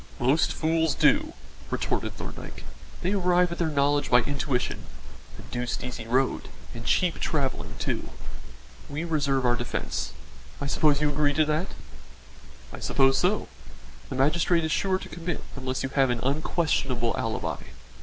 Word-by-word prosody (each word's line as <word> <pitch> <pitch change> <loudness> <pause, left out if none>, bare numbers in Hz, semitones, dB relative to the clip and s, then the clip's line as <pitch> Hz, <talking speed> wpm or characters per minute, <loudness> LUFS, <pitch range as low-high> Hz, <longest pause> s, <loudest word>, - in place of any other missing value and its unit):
"Most 135 +6 +3
fools 160 -1 +1
do," 300 +3 +3 0.4
retorted - - -1
Thorndyke. - - -8 0.4
"They 185 +3 +1
arrive 180 -2 +3
at 170 - -5
their 170 - +2
knowledge 145 -1 +2
by 125 0 +6
intuition 140 -2 -1 0.6
a - - -10
deuced 120 0 -2
easy 125 -3 -5
road 130 +3 +1 0.2
and 115 -1 -7
cheap 180 -2 +2
travelling 140 -4 -1
too. - - -2 0.8
We 145 +3 -3
reserve 140 -5 +1
our 120 0 +4
defence 120 - -3 0.5
I - - -3
suppose 145 0 +3
you 150 - +3
agree 145 0 +2
to 155 - +4
that?" 155 +5 -1 1.0
"I - - -7
suppose 135 -1 +3
so. 190 +4 +1 0.6
The - - -4
magistrate 165 +5 +3
is 160 - -1
sure 190 +3 +2
to - - -8
commit 170 0 -4
unless 130 -1 -2
you 135 - -1
have 135 -1 +3
an 120 -1 0
unquestionable 135 -4 +1
alibi." 115 -1 -2
145 Hz, 150 wpm, -27 LUFS, 130-165 Hz, 1.0 s, by